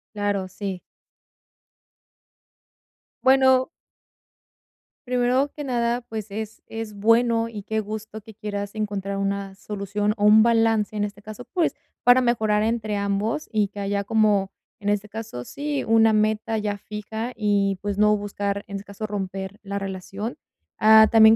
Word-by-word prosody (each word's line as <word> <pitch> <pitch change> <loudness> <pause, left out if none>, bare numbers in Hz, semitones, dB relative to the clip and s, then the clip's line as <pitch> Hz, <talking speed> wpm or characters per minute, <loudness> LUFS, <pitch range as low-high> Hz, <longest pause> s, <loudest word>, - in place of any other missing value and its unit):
Claro, 205 -2 -1
sí. 195 -1 -5 2.4
Bueno 260 0 +5 1.4
primero 250 +3 +2
que 295 - -5
nada, 240 -2 0
pues, 220 -3 -6
es 215 +2 -6
es 225 -1 -6
bueno 230 +2 +3
y 210 -3 -7
qué 220 +2 -1
gusto 215 +1 -6
que 220 0 -14
quieras 205 -1 -5
encontrar 200 -2 -3
una 195 0 -2
solución 205 +1 -2
o 205 - +1
un 215 +1 +8
balance, 225 -2 +2
en 205 - 0
este 205 0 -6
caso, 215 +3 -8
pues, 345 -3 +1 0.3
para 245 +1 +6
mejorar 220 -4 +2
entre 220 -2 -1
ambos 200 +8 -1
y 210 -3 +1
que 205 - -9
haya 200 0 -1
como, 205 -2 +2 0.3
en 205 -1 -2
este 205 0 -1
caso, 220 - -6
sí, 285 - -3
una 225 0 +5
meta 215 +1 +1
ya 205 -1 -2
fija 215 +3 -5
y, 200 -3 +1
pues, 205 -1 -3
no 210 0 +5
buscar, 200 0 -3
en 200 - -6
este 195 +1 -6
caso, 200 +2 -6
romper 195 -1 -5
la 200 0 -3
relación. 195 +3 -5 0.4
Ah, 220 0 +8
también 220 0 +8
210 Hz, 150 wpm, -24 LUFS, 200-225 Hz, 2.4 s, un